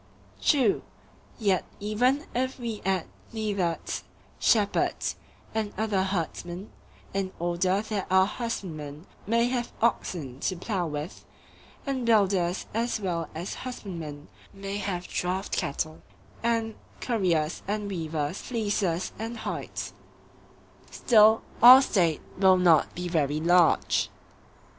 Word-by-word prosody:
True. 260 -9 +3 0.6
Yet 195 -5 +2 0.2
even 250 +8 +1
if 260 +2 -1
we 230 -3 -4
add 190 -2 0 0.3
neatherds, 200 -6 -2 0.4
shepherds, 210 -3 +2 0.4
and 215 -2 -2
other 215 -3 +1
herdsmen, 180 0 -3 0.4
in 195 -1 -1
order 175 +3 +1
that 215 -3 -3
our 190 0 +5
husbandmen 170 - -5 0.2
may 230 +2 +3
have 245 -1 -2
oxen 165 - -1
to 185 - -1
plough 180 -1 -2
with, 150 +3 -5 0.6
and 270 -3 -2
builders 195 -6 +2
as 230 +1 0
well 170 -5 -2
as 170 +4 -4
husbandmen 170 - -7 0.3
may 195 +1 -4
have 185 -3 -3
draught 185 +2 -2
cattle, 155 +3 -2 0.4
and 230 -1 0 0.3
curriers 175 -9 0
and 210 0 -2
weavers 160 -3 -3
fleeces 205 -7 -1
and 225 +2 -4
hides,—still 220 0 0 0.2
our 250 +3 +11
State 170 - +1 0.2
will 190 -1 +6
not 170 -4 +4
be 180 0 -3
very 150 -3 +1
large. 175 +1 +3
195 Hz, 110 wpm, -27 LUFS, 170-220 Hz, 0.6 s, our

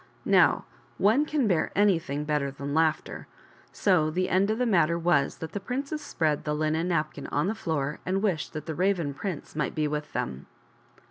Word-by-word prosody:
Now - - +4 0.3
ore 225 +9 +4
can 300 -6 0
bear 175 -5 +1
anything 165 -8 +2
better 150 -2 0
than 140 +1 -5
laughter. 160 0 0 0.4
So 180 -6 +2
the 185 +3 -1
end 190 +3 +2
of 220 - 0
the 250 - +1
matter 170 -7 +3
was 165 -5 +1
that 160 0 -6
the 205 - -3
princess 275 +8 -4
spread 155 - -1
the 150 0 -1
linen 155 +2 0
napkin 155 -3 -2
on - - 0
the 205 - 0
floor 155 -10 -2
and 190 +2 -1
wished 185 -7 -1
that 155 -1 -5
the 160 - -3
Raven 175 -4 0
prince 180 -1 -6
might 150 -3 -2
be 155 -1 +1
with 150 0 -4
them. 65 +2 -4
165 Hz, 190 wpm, -27 LUFS, 150-200 Hz, 0.4 s, Now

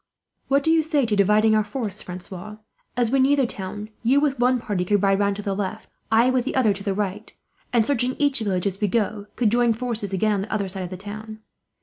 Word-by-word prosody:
"What 275 +1 +2
do 320 - +3
you 325 0 +5
say 300 -4 +1
to 220 -2 0
dividing 210 +2 +4
our 215 0 +3
force, 210 -3 -4
Francois? 185 +3 -8 0.4
As 240 -2 +1
we 270 - +3
near 270 +2 +4
the 275 -2 +2
town, 210 0 -6
you 255 +5 +3
with 280 -3 0
one 250 +1 +3
party 205 -6 -2
could 205 +2 +1
ride 195 0 +3
round 200 -1 +1
to 205 - -6
the 200 - -1
left, 205 +2 -4 0.2
I 230 +3 +5
with 255 -1 +1
the 270 - -3
other 235 -6 +3
to 200 0 -8
the 200 -2 -1
right 200 -1 -3 0.4
and, 235 -3 +3
searching 255 -1 0
each 285 -3 +2
village 195 -4 -1
as 195 0 -2
we 210 - +3
go, 210 -1 -1
could 225 -4 +2
join 240 0 +3
forces 225 -4 -3
again 210 +3 +1
on 200 - 0
the 205 - -6
other 205 -3 -1
side 190 0 -6
of 180 - -4
the 185 - -6
town. 215 +2 -8
215 Hz, 250 wpm, -23 LUFS, 200-245 Hz, 0.4 s, you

